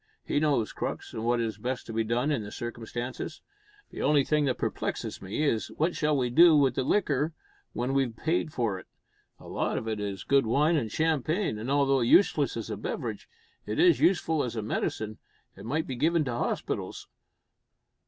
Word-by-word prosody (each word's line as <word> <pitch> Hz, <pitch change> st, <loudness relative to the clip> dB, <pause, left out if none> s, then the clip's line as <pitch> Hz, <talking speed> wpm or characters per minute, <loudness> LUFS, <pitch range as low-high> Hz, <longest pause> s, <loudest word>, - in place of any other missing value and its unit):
He -, -, +1 dB
knows 145 Hz, -8 st, +1 dB
Crux, -, -, -4 dB
and 110 Hz, -, -4 dB
what 120 Hz, +1 st, +2 dB
is 115 Hz, -1 st, -2 dB
best 125 Hz, +1 st, -3 dB
to 115 Hz, -, -7 dB
be 115 Hz, 0 st, +1 dB
done 120 Hz, +6 st, 0 dB
in 140 Hz, -6 st, 0 dB
the 105 Hz, 0 st, -7 dB
circumstances. 120 Hz, +4 st, -5 dB, 0.5 s
The -, -, -6 dB
only 145 Hz, -1 st, +4 dB
thing 150 Hz, +1 st, +1 dB
that 130 Hz, -3 st, 0 dB
perplexes -, -, -3 dB
me, 100 Hz, +11 st, -2 dB
is 115 Hz, -7 st, +1 dB
what 165 Hz, +3 st, +1 dB
shall 150 Hz, -1 st, +1 dB
we 125 Hz, -2 st, 0 dB
do 165 Hz, +3 st, +7 dB
with 135 Hz, -3 st, +4 dB
the 130 Hz, -, -1 dB
liquor 150 Hz, -2 st, +1 dB, 0.4 s
when 125 Hz, +2 st, -1 dB
we've 135 Hz, -4 st, +1 dB
paid 160 Hz, +2 st, 0 dB
for 110 Hz, -9 st, -1 dB
it? -, -, -15 dB, 0.5 s
A -, -, -13 dB
lot -, -, -1 dB
of 110 Hz, -, -4 dB
it 110 Hz, -1 st, -2 dB
is 100 Hz, -2 st, -4 dB
good 140 Hz, -4 st, +3 dB
wine 150 Hz, +8 st, +3 dB
and 115 Hz, -9 st, -1 dB
champagne, 160 Hz, -, 0 dB
and, 115 Hz, +4 st, -5 dB
although 140 Hz, -1 st, +3 dB
useless 120 Hz, +12 st, +4 dB
as -, -, -5 dB
a -, -, -3 dB
beverage, -, -, -5 dB, 0.4 s
it -, -, -2 dB
is 350 Hz, 0 st, +5 dB
useful 165 Hz, -5 st, +2 dB
as 120 Hz, -1 st, -4 dB
a 110 Hz, -, -2 dB
medicine, 110 Hz, 0 st, -3 dB, 0.4 s
and 95 Hz, +3 st, -10 dB
might 155 Hz, +6 st, 0 dB
be 130 Hz, -, -4 dB
given 160 Hz, +4 st, +2 dB
to 125 Hz, -, -2 dB
hospitals." 120 Hz, -, -3 dB
130 Hz, 195 wpm, -28 LUFS, 115-150 Hz, 0.5 s, do